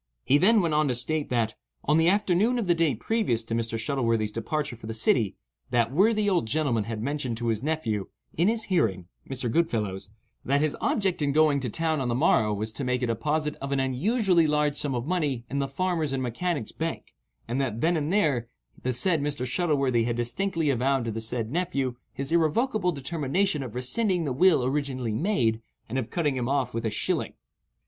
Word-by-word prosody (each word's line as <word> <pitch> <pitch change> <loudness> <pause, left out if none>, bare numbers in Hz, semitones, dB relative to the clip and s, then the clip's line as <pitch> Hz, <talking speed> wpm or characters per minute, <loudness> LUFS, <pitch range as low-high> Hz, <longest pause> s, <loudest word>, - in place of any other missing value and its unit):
He 145 - +4
then 215 +5 +5
went 165 -3 0
on 150 0 +3
to 125 - 0
state 150 +5 -2
that, 115 -3 0 0.3
on 150 +3 +3
the 160 - +4
afternoon 205 +4 +2
of 235 - -1
the 175 - +4
day 165 -6 +2
previous 125 - 0
to 115 - -5
Mr. 115 0 -1
Shuttleworthy's 115 -3 0
departure 130 +4 -3
for 110 -1 -11
the 110 - -4
city, 110 -2 +2 0.3
that 120 -1 +2
worthy 210 +7 +3
old 180 - +2
gentleman 125 -6 +1
had 110 -1 -4
mentioned 135 -4 -2
to 120 0 -1
his 110 -2 -1
nephew, 125 -10 -1 0.3
in 170 +4 +2
his 225 0 +1
hearing 110 - 0 0.2
(Mr. 130 -2 -2
Goodfellow's), 105 - -1 0.3
that 140 +2 +2
his 155 0 0
object 195 -7 0
in 145 -1 +1
going 150 -1 +4
to 130 -2 -3
town 160 +3 0
on 130 - -1
the 120 - 0
morrow 115 -6 +3
was 105 +2 -3
to 135 - -6
make 125 0 0
a - - +3
deposit 150 +7 -1
of 140 0 -4
an 140 - +1
unusually 170 - +2
large 150 -1 +1
sum 140 -3 -1
of 120 0 -2
money 150 -8 -1
in 140 - -1
the 140 - 0
"Farmers' 160 0 -1
and 130 -1 -1
Mechanics' 130 +2 -2
Bank," 165 0 -5 0.3
and 125 +4 -1
that, 115 -4 -2
then 170 +2 +3
and 155 0 -1
there, 150 - +2 0.3
the 130 - -1
said 160 +5 +1
Mr. 145 -3 -2
Shuttleworthy 135 -5 +1
had 120 -1 -1
distinctly 150 +7 0
avowed 135 0 +1
to 115 - -2
the 110 +1 -4
said 110 0 -3
nephew 140 -7 -1 0.2
his 135 +2 -5
irrevocable 180 - +2
determination 150 +3 -1
of 125 -4 -7
rescinding 180 - 0
the 140 -4 -1
will 160 -2 +4
originally 130 -4 -1
made, 115 - +1 0.3
and 130 +4 -2
of 120 - -4
cutting 150 -6 0
him 125 -1 -2
off 135 -3 0
with 115 0 -3
a - - +1
shilling. 105 - -2
140 Hz, 205 wpm, -27 LUFS, 120-165 Hz, 0.3 s, then